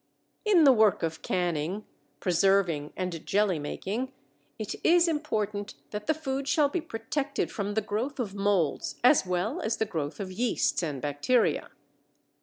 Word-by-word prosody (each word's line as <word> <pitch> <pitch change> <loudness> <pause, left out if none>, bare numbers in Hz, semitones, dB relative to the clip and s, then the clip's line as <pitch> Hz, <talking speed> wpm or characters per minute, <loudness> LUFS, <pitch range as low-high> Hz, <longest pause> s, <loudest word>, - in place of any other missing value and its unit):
In 390 -6 +5
the 275 -3 +8
work 215 -6 +3
of 160 0 -2
canning, 175 +2 -1 0.3
preserving, 180 -4 +2
and 180 -3 -3
jelly 200 -5 +1
making 215 - -3 0.5
it - - -4
is 345 +1 +5
important 215 -10 -2 0.2
that 210 0 -5
the 315 - +3
food 275 -3 -3
shall 285 +1 +3
be 345 +4 -2
protected 275 +4 -3
from 205 0 -3
the 220 - +2
growth 225 +7 -3
of 210 -6 -2
molds 200 -6 0
as 250 -6 +5
well 180 +4 -1
as 220 +2 -1
the 220 - +1
growth 160 -6 -4
of 190 -2 -4
yeasts 230 +1 +1
and 145 -6 -4
bacteria. 145 - +1
205 Hz, 155 wpm, -28 LUFS, 180-260 Hz, 0.5 s, the